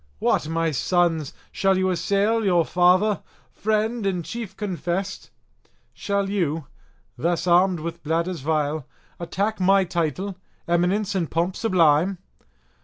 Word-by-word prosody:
what, 150 Hz, -, +1 dB
my 165 Hz, 0 st, 0 dB
sons, 165 Hz, -1 st, +1 dB, 0.2 s
shall 195 Hz, -1 st, +2 dB
you 185 Hz, 0 st, +1 dB
assail 200 Hz, +5 st, +1 dB
your 175 Hz, -4 st, +3 dB
father, 185 Hz, +3 st, +3 dB, 0.3 s
friend, 220 Hz, +2 st, 0 dB
and 180 Hz, -4 st, -2 dB
chief 230 Hz, -4 st, -6 dB
confessed? 190 Hz, -1 st, -3 dB, 0.6 s
Shall 200 Hz, -1 st, -1 dB
you, 165 Hz, -6 st, -1 dB, 0.5 s
thus 170 Hz, +4 st, 0 dB
armed 180 Hz, 0 st, +4 dB
with 170 Hz, +2 st, -6 dB
bladders 165 Hz, +3 st, -1 dB
vile, 150 Hz, 0 st, -1 dB, 0.3 s
attack 200 Hz, +5 st, -2 dB
my 195 Hz, +1 st, +4 dB
title, 180 Hz, +2 st, -2 dB, 0.3 s
eminence, 180 Hz, +4 st, +1 dB
and 175 Hz, -5 st, -1 dB
pomp 170 Hz, +3 st, -1 dB
sublime? 180 Hz, -3 st, +3 dB
180 Hz, 120 wpm, -23 LUFS, 165-195 Hz, 0.6 s, armed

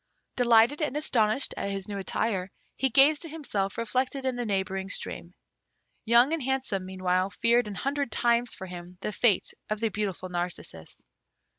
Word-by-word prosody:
Delighted 240 Hz, +4 st, +4 dB
and 295 Hz, -1 st, -1 dB
astonished 235 Hz, -4 st, +1 dB
at 200 Hz, -, -2 dB
his 195 Hz, -1 st, -4 dB
new 200 Hz, -1 st, -4 dB
attire, 195 Hz, -1 st, -2 dB, 0.3 s
he 265 Hz, -, +1 dB
gazed 285 Hz, +5 st, +6 dB
at 330 Hz, -, -1 dB
himself 210 Hz, -11 st, -3 dB
reflected 255 Hz, +4 st, -1 dB
in 260 Hz, -1 st, 0 dB
the 245 Hz, -1 st, -3 dB
neighbouring 190 Hz, -1 st, -2 dB
stream. -, -, -4 dB, 0.7 s
Young 240 Hz, +6 st, +5 dB
and 330 Hz, -, -1 dB
Handsome, 255 Hz, -8 st, -2 dB
meanwhile, 185 Hz, 0 st, 0 dB
feared 235 Hz, +3 st, +2 dB
an 205 Hz, -, -6 dB
hundred 275 Hz, +3 st, -2 dB
times 235 Hz, 0 st, +1 dB
for 190 Hz, -, -8 dB
him 180 Hz, 0 st, -10 dB
the 210 Hz, -, -3 dB
fate 210 Hz, -2 st, +2 dB, 0.2 s
of 215 Hz, 0 st, -2 dB
the 225 Hz, 0 st, 0 dB
beautiful 195 Hz, -3 st, -3 dB
Narcissus. 175 Hz, -, -5 dB
220 Hz, 165 wpm, -27 LUFS, 190-260 Hz, 0.7 s, gazed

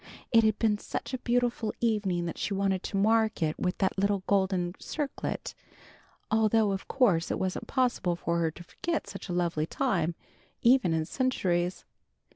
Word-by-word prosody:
It 230 Hz, -1 st, +6 dB
had 215 Hz, -1 st, +2 dB
been 210 Hz, -2 st, +2 dB
such -, -, -5 dB
a 255 Hz, -, -2 dB
beautiful 240 Hz, -2 st, 0 dB
evening 205 Hz, -7 st, 0 dB
that 170 Hz, -, -5 dB
she 200 Hz, -, -1 dB
wanted 195 Hz, -1 st, +1 dB
to 195 Hz, -, -3 dB
mark 220 Hz, -1 st, +2 dB
it 155 Hz, -1 st, -1 dB
with 180 Hz, 0 st, -1 dB
that 190 Hz, 0 st, 0 dB
little 200 Hz, -1 st, +1 dB
golden 190 Hz, -3 st, +1 dB
circlet, 295 Hz, -3 st, -4 dB, 0.8 s
although 220 Hz, -1 st, +3 dB
of 195 Hz, 0 st, -4 dB
course 200 Hz, -11 st, +2 dB
it -, -, -1 dB
wasn't 185 Hz, -1 st, -3 dB
possible 245 Hz, -9 st, +1 dB
for 170 Hz, 0 st, -1 dB
her 165 Hz, -1 st, +2 dB
to 165 Hz, +2 st, -11 dB
forget 335 Hz, -, -3 dB
such 200 Hz, -2 st, -8 dB
a -, -, -2 dB
lovely 170 Hz, -3 st, 0 dB
time, 175 Hz, -11 st, 0 dB, 0.5 s
even 235 Hz, -9 st, +5 dB
in 160 Hz, -1 st, 0 dB
centuries. 180 Hz, -, 0 dB
195 Hz, 170 wpm, -29 LUFS, 175-225 Hz, 0.8 s, It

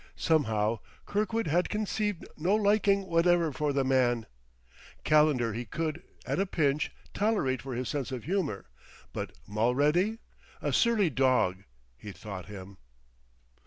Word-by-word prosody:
Somehow, 110 Hz, -8 st, +1 dB, 0.3 s
Kirkwood 215 Hz, +2 st, 0 dB
had 175 Hz, +4 st, +1 dB
conceived 210 Hz, -2 st, -2 dB
no 180 Hz, +6 st, +1 dB
liking 200 Hz, -2 st, +3 dB
whatever 170 Hz, -2 st, +3 dB
for 150 Hz, +1 st, -1 dB
the 140 Hz, -1 st, +1 dB
man; 125 Hz, -3 st, +2 dB, 0.8 s
Calendar 150 Hz, -7 st, +3 dB
he 120 Hz, +3 st, -3 dB
could, 155 Hz, -, -3 dB, 0.2 s
at -, -, -1 dB
a 195 Hz, -, +1 dB
pinch, 150 Hz, -4 st, +1 dB, 0.2 s
tolerate 200 Hz, -, +1 dB
for 130 Hz, -2 st, -5 dB
his 125 Hz, +1 st, -3 dB
sense 140 Hz, -3 st, -3 dB
of 125 Hz, -3 st, -5 dB
humor, 165 Hz, -, -2 dB, 0.5 s
but -, -, -4 dB, 0.2 s
Mulready! 145 Hz, -, +2 dB, 0.4 s
"A -, -, -2 dB
surly 220 Hz, -8 st, +3 dB
dog," 125 Hz, -8 st, +2 dB, 0.3 s
he 105 Hz, -, -8 dB
thought 95 Hz, 0 st, -8 dB
him. 100 Hz, -2 st, -10 dB
150 Hz, 130 wpm, -29 LUFS, 120-190 Hz, 0.8 s, liking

